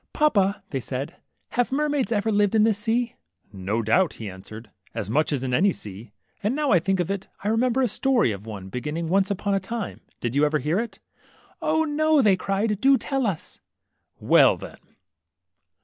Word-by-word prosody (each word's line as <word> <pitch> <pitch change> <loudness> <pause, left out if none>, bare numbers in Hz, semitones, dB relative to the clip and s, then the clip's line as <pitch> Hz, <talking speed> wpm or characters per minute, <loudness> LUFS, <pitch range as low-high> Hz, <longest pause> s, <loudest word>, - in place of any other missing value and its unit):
Papa/' 205 -10 +2 0.2
said 130 +4 -4
they, - - -24 0.4
have 245 +1 +2
mermaids 290 -3 0
ever 220 0 +1
lived 205 0 +2
in 215 - +5
this 215 -2 +2
sea? 230 +2 0 0.2
" 95 +3 -23
^^No 105 +4 -2
doubt," 175 - +3
he 110 - -7
answered, 105 +3 -11 0.2
^^as 105 - -3
much 155 +5 +2
as 135 -3 -1
in 130 -1 -2
any 195 +9 +4
sea; 105 - -8 0.3
and 215 +5 0
now 295 -2 0
I 180 - +6
think 190 +3 0
of 175 +2 0
it, 195 -1 -4 0.2
I 205 - 0
remember 245 +3 +2
a - - +3
story 240 - +2
of 100 +1 -7
one, 100 -3 -7
beginning, 150 - -3
^ - - -5
Once 195 +2 +2
upon 200 0 -1
a 195 - +2
time; 215 +2 -5
' - - -37
did 120 +1 -3
you 145 - +3
ever 150 +1 +3
hear 150 +7 0
it?" 235 0 -4 0.7
0, 315 +1 +2
no," 310 0 +2
they 210 -7 +5
cried; 200 +2 -1
do 270 0 +6
tell 270 0 -1
us! 180 -6 -5 0.3
" - - -49
^^Well - - +5
then." - - -10
195 Hz, 210 wpm, -24 LUFS, -, 0.7 s, I